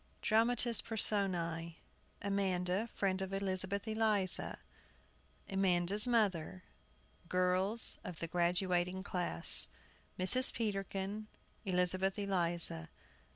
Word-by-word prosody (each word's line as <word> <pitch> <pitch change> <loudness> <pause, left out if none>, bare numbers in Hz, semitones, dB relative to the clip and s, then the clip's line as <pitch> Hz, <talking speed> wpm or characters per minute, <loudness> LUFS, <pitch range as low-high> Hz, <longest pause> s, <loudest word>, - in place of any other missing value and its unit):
Dramatis 230 +1 +2
Personæ. 175 -7 -1 0.5
Amanda 195 +1 -1
(friend 190 -1 -1
of 190 0 -4
Elizabeth 195 +1 -1
Eliza), 215 -4 0 0.9
Amanda's 195 +2 +3
mother, 190 -6 0 0.7
girls 185 +5 +1
of 180 -5 -7
the 170 - -4
graduating 180 +1 0
class, 180 -3 +1 0.5
Mrs. 255 +8 +6
Peterkin, 200 -1 -4 0.4
Elizabeth 185 +1 +1
Eliza. 175 - 0
190 Hz, 80 wpm, -34 LUFS, 180-205 Hz, 0.9 s, Mrs